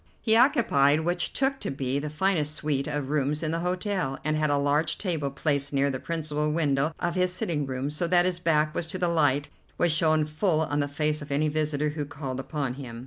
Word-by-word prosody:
He 220 -1 +3
occupied 220 - +4
what 175 +2 0
I - - -1
took 270 0 +1
to - - -4
be 135 0 -2
the 150 +1 -4
finest 155 -2 0
suite 145 -3 -1
of 145 -2 -3
rooms 150 +1 0
in 155 - -1
the 165 - -1
hotel, 180 -5 -1
and 155 0 0
had 155 0 +1
a 145 - +2
large 145 +3 +1
table 160 -8 -2
placed 140 0 -1
near 140 0 +2
the 130 - -4
principal 150 -2 -2
window 150 -1 +1
of 175 - -1
his 180 0 +1
sitting 160 -5 -2
room, 130 +2 -3
so 160 +3 -1
that 175 0 +4
his 180 -1 0
back 155 -3 +2
was 165 - -2
to 185 - -4
the 180 -1 +1
light, 145 -4 +2 0.3
which 175 - +2
shone 155 -1 +2
full 155 +2 +1
on 145 -2 -1
the 145 - +1
face 150 +1 -1
of 145 0 -8
any 150 +2 +1
visitor 150 -1 0
who 150 0 -4
called 135 -3 -5
upon 135 -1 -3
him. 115 -3 -8
150 Hz, 230 wpm, -27 LUFS, 145-170 Hz, 0.3 s, occupied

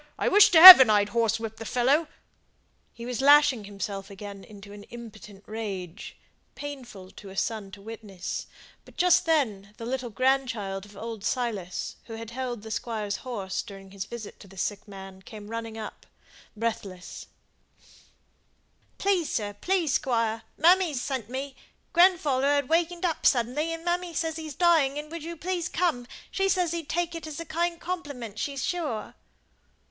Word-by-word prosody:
I - - 0
wish 415 +1 +7
to 330 - +6
heaven 325 -9 +13
I'd 205 -1 +3
horsewhipped 225 -1 -1
the - - -7
fellow!" 265 +8 +1 0.8
He 235 - -10
was 250 +1 -3
lashing 285 -5 +5
himself 200 0 -6
again 200 0 -9
into 205 -1 -13
an 205 - -11
impotent 215 -4 -12
rage, 200 -5 -7 0.4
painful 245 -10 -9
to 200 - -12
a 190 - -12
son 215 0 -2
to 200 0 -11
witness; 210 -4 -7 0.4
but - - -19
just 360 0 +4
then 210 -11 0
the 230 - -7
little 250 0 -3
grandchild 235 -6 -1
of 205 -1 -16
old 225 -1 -7
Silas, 210 -9 -3
who 225 - -8
had 225 0 -8
held 245 -3 -5
the 220 - -8
Squire's 215 -2 -3
horse 195 -7 -4
during 195 -3 -12
his 195 -1 -6
visit 235 -3 -9
to - - -14
the 195 0 -16
sick 205 +1 -3
man, 195 -1 -11
came 210 +1 -11
running 225 -1 -6
up, 215 -1 -9 0.5
breathless: 200 -5 -5 1.7
"Please, 380 -5 0
sir, 205 -2 -2
please, 335 - -1
squire, 230 -3 0 0.2
mammy 365 +2 +5
has 260 - -2
sent 255 -5 -4
me; 265 +1 -5 0.4
grandfather 330 -7 +3
has 285 -1 +2
wakened 340 +4 0
up 330 -3 -2
sudden, 245 -1 +2
and 330 +2 -3
mammy 350 -1 -2
says 320 0 -2
he's 310 -3 -7
dying, 320 -6 +3
and 300 +1 -7
would 335 -1 -6
you 335 +1 -7
please 360 +1 -3
come; 320 -9 -1 0.2
she 390 0 0
says 360 -3 +1
he'd 335 -3 -5
take 345 0 -1
it 330 -1 -7
as 310 +1 -7
a 335 - -6
kind 340 +2 -2
compliment, 285 - -6
she's 275 -3 -3
sure." 300 -12 -3
240 Hz, 165 wpm, -26 LUFS, 210-320 Hz, 1.7 s, heaven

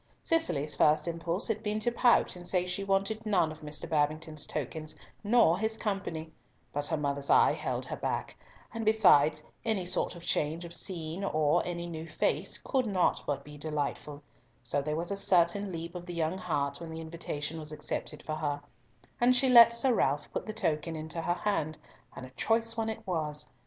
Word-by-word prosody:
Cicely's 165 - +1
first 155 +3 +3
impulse 170 +2 -1
had 220 -2 -1
been 210 0 -1
to 240 - +1
pout 240 -3 +3
and 175 0 -8
say 180 -1 +1
she 180 +2 -2
wanted 195 +3 0
none 180 -7 +2
of 155 - -10
Mr. 150 -1 -5
Babington's 155 0 -1
tokens, 155 +2 -4 0.3
nor 205 -5 +4
his 220 +1 0
company; 195 -7 -3 0.4
but 145 0 -1
her 160 - 0
mother's 140 -1 -2
eye - - +6
held - - -3
her - - -4
back, - - -3 0.4
and 230 -1 -3
besides 160 -9 +5 0.2
any 220 -6 0
sort 180 - -1
of 170 - -11
change 160 +2 0
of 170 - -8
scene, 170 0 -2
or 155 -2 +2
any 170 -1 -3
new 165 -1 -6
face, - - -1
could 260 -4 -1
not 190 -4 +2
but 140 -1 -2
be 150 0 -11
delightful, 150 -1 -3 0.4
so 140 +4 0
there 150 +2 -2
was 170 +4 -2
a - - 0
certain 195 0 +2
leap 170 0 -5
of 175 -1 -8
the 175 - -5
young 165 +3 -1
heart 140 -5 -2
when 165 - -7
the 160 0 -6
invitation 160 -1 -5
was 155 -1 -5
accepted 155 - -4
for 155 - -4
her; 145 -2 -2 0.6
and 245 +1 +5
she 265 +1 +4
let 235 -2 +9
Sir 245 +2 +2
Ralf 145 -8 0
put - - -3
the - - -2
token 160 -6 -1
into 155 +1 -5
her 175 +2 0
hand, 155 -7 -1 0.4
and 130 - -7
a 130 - -13
choice 230 - 0
one 225 -1 -1
it 220 0 -6
was. 150 -5 -2
170 Hz, 195 wpm, -30 LUFS, 150-200 Hz, 0.6 s, let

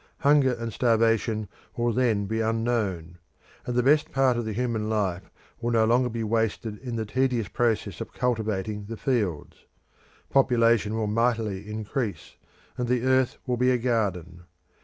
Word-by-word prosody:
Hunger 140 -3 +4
and 115 -2 -5
starvation 115 -2 +1 0.3
will 120 0 +1
then 115 -5 +1
be 110 +3 -1
unknown, 110 -7 -1 0.5
and 125 - -2
the 125 - +3
best 150 +3 +3
part 135 -2 +3
of 120 -1 -2
the 110 - -3
human 115 -2 -1
life 95 -4 -1 0.3
will 120 0 -2
no 115 -2 +3
longer 125 +2 +3
be 115 -1 -3
wasted 110 -1 -1
in 125 -3 -5
the 110 -1 -2
tedious 125 -1 0
process 115 0 -1
of - - -6
cultivating 110 -4 -2
the 115 +2 -7
fields. 105 - -2 0.6
Population 115 -5 +3
will 110 -1 -1
mightily 110 -2 0
increase, 110 +1 -4 0.4
and 125 - -1
the 125 0 +1
earth 130 -1 +2
will 125 -2 -1
be 125 +1 +3
a 125 - +3
garden. 95 -8 -2
115 Hz, 160 wpm, -26 LUFS, 105-125 Hz, 0.6 s, Hunger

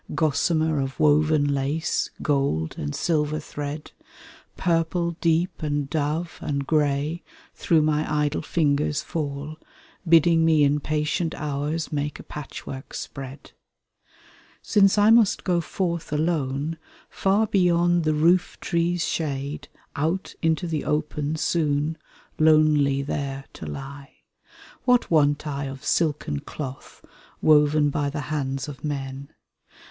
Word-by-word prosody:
Gossamer 155 -1 +1
of 135 0 -5
woven 150 -1 +3
lace, 140 +4 -1
gold 135 - 0
and 75 -1 -4
silver 155 -2 0
thread, 145 0 -6 0.7
Purple 170 0 +1
deep 170 +2 +1
and 145 -2 -1
dove, 155 +2 -2
and 140 -3 -2
grey, 150 +2 0 0.3
through 160 -3 +2
my 150 0 0
idle 150 -1 0
fingers 150 -2 0
fall. 150 -1 -4 0.5
Bidding 165 0 +5
me 160 -2 +4
in 145 +1 +3
patient 155 +3 -1
hours 150 +2 -3
make 145 0 -3
a - - -9
patchwork 135 -2 -8
spread. 135 0 -8 1.1
Since 195 -1 +4
I 205 +2 +6
must 225 -3 +4
go 175 -2 +1
forth 170 -1 -3
alone, 150 -1 -1 0.3
far 200 +3 +1
beyond 175 -3 +2
the 155 -1 +1
roof 170 +4 +2
tree*s 170 0 0
shade. 145 -2 -3 0.3
Out 165 +6 -1
into 160 +2 +1
the 160 -3 -2
open 150 0 -1
soon 155 -1 0 0.4
lonely 155 -3 +4
there 135 -1 -4
to 80 - -8
lie. 135 - -8 0.7
What 250 -5 +3
want 145 -2 +3
I 140 -1 -3
of 135 +1 -8
silken 150 - 0
cloth 135 - -8 0.3
woven 150 -1 +4
by 145 0 -1
the 150 +1 -4
hands 135 -2 -2
of 145 -2 -9
men? 140 -2 -4
150 Hz, 120 wpm, -24 LUFS, 140-165 Hz, 1.1 s, I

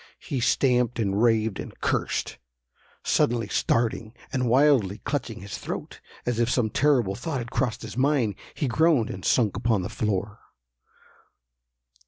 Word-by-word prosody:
He 140 -6 -4
stamped, 125 -1 +2
and 100 -2 0
raved 110 -3 +2
and - - -8
cursed. - - -1 0.6
Suddenly 115 -3 +1
starting, 115 +1 0 0.2
and 125 -2 0
wildly 125 -7 +4
clutching 125 -8 -3
his 100 0 -7
throat, - - -6 0.2
as 120 -2 -1
if 120 0 +2
some 120 -4 +1
terrible 125 -9 +2
thought 140 +6 -4
had 120 -2 -5
crossed 120 -4 -1
his - - -7
mind, 130 -5 +2 0.2
he 145 - -1
groaned 145 -2 +3
and 95 - -8
sunk 110 -6 +2
upon 110 -5 +1
the - - -4
floor. 105 -1 -2
120 Hz, 145 wpm, -26 LUFS, 110-130 Hz, 0.6 s, wildly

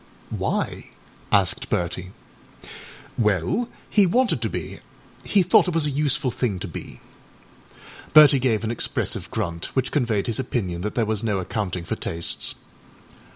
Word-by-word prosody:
â - - -4
âWhy?â - - -2 0.5
asked - - +2
Bertie. 90 +1 -2 1.1
âWell, 105 - +1 0.2
he 205 -3 +4
wanted 250 +8 +2
to - - -1
be; - - -6 0.5
he 200 -3 +3
thought 180 - +5
it 180 - -1
was 165 -2 +3
a 145 - +1
useful 145 -1 +1
thing 115 -5 -1
to 95 - -5
be.â 65 -6 -14 0.3
Bertie 150 -2 +8
gave 115 -4 +1
an 110 - -1
expressive 120 - -1
grunt, 85 -6 -3
which 130 -1 0
conveyed 115 -8 0
his 115 0 -1
opinion 95 -9 -2
that 105 +3 -4
there 115 - +2
was 110 0 -1
no 105 -3 0
accounting 90 -1 -3
for - - -3
tastes. 85 0 -1
110 Hz, 155 wpm, -23 LUFS, 95-145 Hz, 1.1 s, Bertie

